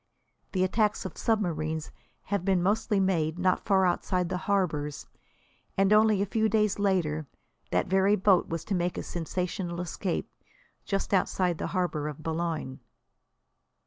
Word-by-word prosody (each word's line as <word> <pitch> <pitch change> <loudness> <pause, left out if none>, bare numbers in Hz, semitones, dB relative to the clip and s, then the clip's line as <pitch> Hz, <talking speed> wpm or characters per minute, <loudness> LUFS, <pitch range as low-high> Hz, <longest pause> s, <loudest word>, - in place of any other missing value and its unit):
The 185 -1 +2
attacks 210 +2 +1
of 185 - -6
submarines 160 -8 -1 0.3
have 200 -3 -2
been 185 -2 +2
mostly 210 +1 +1
made 170 -4 +1
not 185 0 +1
far 190 -2 +4
outside 180 0 0
the 185 - -1
harbours, 155 -7 0 0.7
and 195 +1 +4
only 215 -2 +5
a - - 0
few 220 +2 +1
days 215 -1 +1
later 165 -7 0 0.4
that 90 - +1
very 190 +2 +3
boat 190 -2 +3
was 165 -1 -4
to 205 - -2
make 175 -1 0
a - - -3
sensational 175 +1 -3
escape 180 +1 -3 0.6
just 195 0 -2
outside 185 -2 +1
the - - -2
harbour 165 -5 -1
of 150 +1 -7
Boulogne. 160 -4 -3
185 Hz, 145 wpm, -28 LUFS, 165-200 Hz, 0.7 s, only